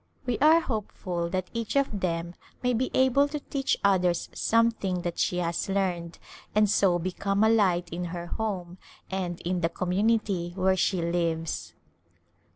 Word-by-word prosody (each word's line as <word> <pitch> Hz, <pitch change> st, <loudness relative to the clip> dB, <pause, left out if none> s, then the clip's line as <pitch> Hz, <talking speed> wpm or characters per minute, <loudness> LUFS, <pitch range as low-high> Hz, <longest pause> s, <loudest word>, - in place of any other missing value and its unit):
We 245 Hz, -3 st, -1 dB
are 315 Hz, +4 st, +6 dB
hopeful 185 Hz, -, -3 dB
that 185 Hz, 0 st, -3 dB
each 230 Hz, 0 st, -3 dB
of 270 Hz, -7 st, +1 dB
them 170 Hz, -1 st, -2 dB, 0.3 s
may 250 Hz, 0 st, +2 dB
be 250 Hz, +3 st, 0 dB
able 260 Hz, +2 st, +4 dB
to 295 Hz, +1 st, -4 dB
teach 275 Hz, -1 st, -1 dB
others 180 Hz, -3 st, +2 dB
something 225 Hz, -6 st, +1 dB
that 175 Hz, -1 st, -3 dB
she 180 Hz, -, +1 dB
has 170 Hz, +1 st, -1 dB
learned 180 Hz, -4 st, -1 dB, 0.4 s
and 210 Hz, 0 st, +5 dB
so 190 Hz, -3 st, +3 dB
become 195 Hz, +3 st, -1 dB
a 220 Hz, -, +5 dB
light 185 Hz, -6 st, +3 dB
in 175 Hz, +1 st, -3 dB
her 175 Hz, 0 st, -5 dB
home 185 Hz, -3 st, -4 dB, 0.3 s
and 180 Hz, -2 st, -3 dB
in 180 Hz, 0 st, -1 dB
the 165 Hz, -, +2 dB
community 185 Hz, -1 st, 0 dB
where 190 Hz, 0 st, +2 dB
she 185 Hz, -1 st, +1 dB
lives. 165 Hz, -1 st, -2 dB
185 Hz, 160 wpm, -27 LUFS, 175-220 Hz, 0.4 s, are